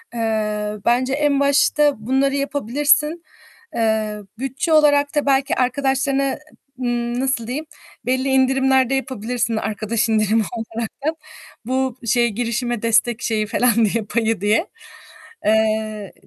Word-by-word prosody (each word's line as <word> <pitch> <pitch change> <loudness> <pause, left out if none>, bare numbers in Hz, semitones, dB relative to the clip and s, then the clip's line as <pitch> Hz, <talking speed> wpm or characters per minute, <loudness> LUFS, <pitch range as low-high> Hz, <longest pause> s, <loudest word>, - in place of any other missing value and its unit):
Eee, 210 -2 -1
bence 255 +2 +2
en 290 -1 +1
başta 285 +1 +3
bunları 275 +1 +2
yapabilirsin. 290 +4 +1 0.5
Eee, 220 -2 0 0.2
bütçe 270 +5 -1
olarak 290 -1 +4
da 295 - +1
belki 270 -1 +2
arkadaşlarına, 270 +1 0 0.4
ımm, 240 0 -1
nasıl 260 -4 -1
diyeyim, 295 +6 -4 0.4
belli 260 +2 0
indirimlerde 265 0 +3
yapabilirsin 240 -3 -2
arkadaş 220 +1 -1
indirimi 215 0 +2
olaraktan. 230 +7 -4 0.5
Bu 260 0 -1
şeye 235 +1 +3
girişime 240 +1 -2
destek 230 +1 +2
şeyi 215 -2 -1
falan 235 -1 +2
diye, 220 +2 -1
payı 225 -2 -1
diye. 215 - +2 0.8
Eee, 215 -1 0
245 Hz, 115 wpm, -20 LUFS, 220-275 Hz, 0.8 s, olarak